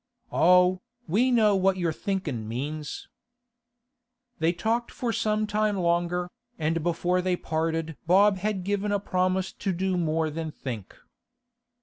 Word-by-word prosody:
'Oh, 180 +1 +4 0.3
we 220 +10 +3
know 220 -5 +4
what 190 0 +2
your 170 -3 0
thinkin' 185 - -3
means.' 145 +6 -5 1.3
They 160 +1 +3
talked 225 +7 -1
for 240 -2 -3
some 215 -2 +1
time 210 -1 0
longer, 175 0 0 0.3
and 160 +1 0
before 175 +2 +1
they 180 0 +1
parted 160 -1 -2
Bob 195 +3 +5
had 200 -1 -2
given 205 +2 -1
a 205 - +1
promise 185 -1 0
to 195 - -2
do 185 +1 -1
more 160 -2 0
than 160 +1 -4
think. 120 -9 -7
180 Hz, 135 wpm, -27 LUFS, 165-200 Hz, 1.3 s, Bob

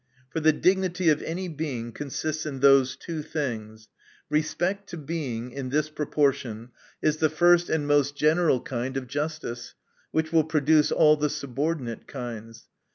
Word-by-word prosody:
For 160 - -2
the 155 0 +5
dignity 180 +1 +2
of 150 -1 +3
any 180 +3 -4
Being 140 -8 -4
consists 150 +4 -4
in 135 -3 -5
those 135 -2 +5
two 165 -3 -5
things 110 -8 -5 0.4
Respect 175 +6 -1
to 175 - -6
Being, 135 -6 -4
in 135 0 -5
this 150 +3 0
proportion, 135 -6 -1 0.3
is 155 0 +2
the 155 0 +2
first 175 +2 +4
and 160 -2 0
most 145 -1 +2
general 155 -2 +3
kind 130 +1 -3
of 135 - -3
justice; 145 -3 -4 0.3
which 160 0 -1
will 160 -1 +5
produce 155 0 +3
all 155 -1 +5
the 150 0 0
subordinate 140 -3 -3
kinds. 115 -3 -8
150 Hz, 155 wpm, -26 LUFS, 130-160 Hz, 0.4 s, the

